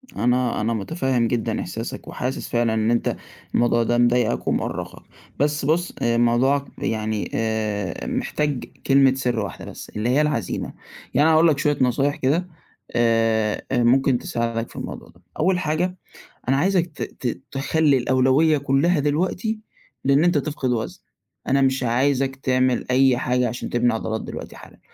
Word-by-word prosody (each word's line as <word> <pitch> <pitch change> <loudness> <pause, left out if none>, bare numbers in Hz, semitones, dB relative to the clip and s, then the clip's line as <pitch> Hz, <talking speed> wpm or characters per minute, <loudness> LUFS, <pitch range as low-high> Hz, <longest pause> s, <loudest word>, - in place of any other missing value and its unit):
أنا 125 -1 +1
أنا 115 +2 0
متفهّم 125 - 0
جدًا 115 -2 -1
إحساسك 115 +1 -6
وحاسس 130 +2 -4
فعلًا 120 -1 +1
إن 110 +1 +1
أنت 120 - 0 0.4
الموضوع 120 -1 +3
ده 120 +1 +1
مضايقك 120 -1 +2
ومُؤرقك، - - -2 0.4
بس 145 0 +1
بُصّ، 170 +4 +1
موضوعك 120 +4 +2
يعني 110 -1 -2
آآ، 105 -5 -2
محتاج 145 -4 -2 0.2
كلمة 135 -1 +5
سِرّ 125 -3 -1
واحدة 100 -3 -5
بس - - -9
اللي 105 +3 -2
هي 135 +4 +3
العَزيمة. 150 0 -2 0.4
يعني 145 +4 +4
أنا 160 - +5
هاقول 160 +2 +5
لك 155 -3 +3
شوية 145 0 +1
نصايح 135 +3 +2
كده 155 +7 0 0.4
آآ، 115 -2 +1
أ 120 -2 +2
ممكن 130 +2 +4
تساعدك 115 -1 -3
في - - -16
الموضوع - - -7
ده، 85 - -22 0.2
أول 185 -1 +2
حاجة 180 +3 -1 0.5
أنا 135 - +3
عايزك 185 +2 +2
ت 150 - -13
ت 125 -1 -5
تخلّي 145 +1 +2
الأولوية 130 +5 +3
كُلّها 140 +4 +2
دلوقتي 180 +9 -1 0.4
لإن 140 +3 +4
أنت 175 -3 +3
تفقد 140 -2 -2
وزن، 115 -2 -3 0.5
أنا 135 +1 +3
مش 130 0 +2
عايزك 135 +2 +1
تعمل 130 -1 +1
أي 130 -1 +4
حاجة 125 0 +1
عشان 120 - -5
تبني 120 -1 +2
عضلات 110 0 -3
دلوقتي - - -8
حالًا، - - -14
130 Hz, 155 wpm, -22 LUFS, 115-145 Hz, 0.5 s, كلمة